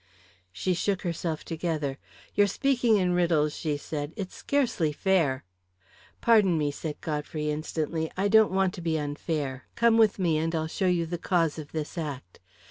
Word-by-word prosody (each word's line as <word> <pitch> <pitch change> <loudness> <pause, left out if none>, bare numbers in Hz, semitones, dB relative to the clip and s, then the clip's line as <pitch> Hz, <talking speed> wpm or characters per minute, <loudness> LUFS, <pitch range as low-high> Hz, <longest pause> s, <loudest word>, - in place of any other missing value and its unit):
She 100 - -1
shook 190 +2 -1
herself 170 -2 -3
together. 155 -4 -2 0.3
"You're 205 0 +4
speaking 245 0 +2
in 180 -2 +1
riddles," 165 -4 +2
she 150 -3 -2
said. 145 +1 -5
"It's 195 -4 -5
scarcely 245 - 0
fair." 150 -6 +1 0.8
"Pardon 210 -7 +5
me," 145 -2 0
said 150 +1 -6
Godfrey 150 0 -2
instantly. 160 +1 -2
"I 195 +2 +2
don't 220 +1 +6
want 190 -1 +2
to 175 - -7
be 165 -1 0
unfair. 145 -2 -3
Come 235 -1 +4
with 220 -3 +4
me 170 -5 +1
and 165 +1 -1
I'll 160 -1 0
show 185 +4 -1
you 175 -2 +2
the 170 +1 -4
cause 165 -4 +1
of 145 -2 -9
this 155 +2 -4
act. 135 - -6
165 Hz, 170 wpm, -27 LUFS, 150-190 Hz, 0.8 s, don't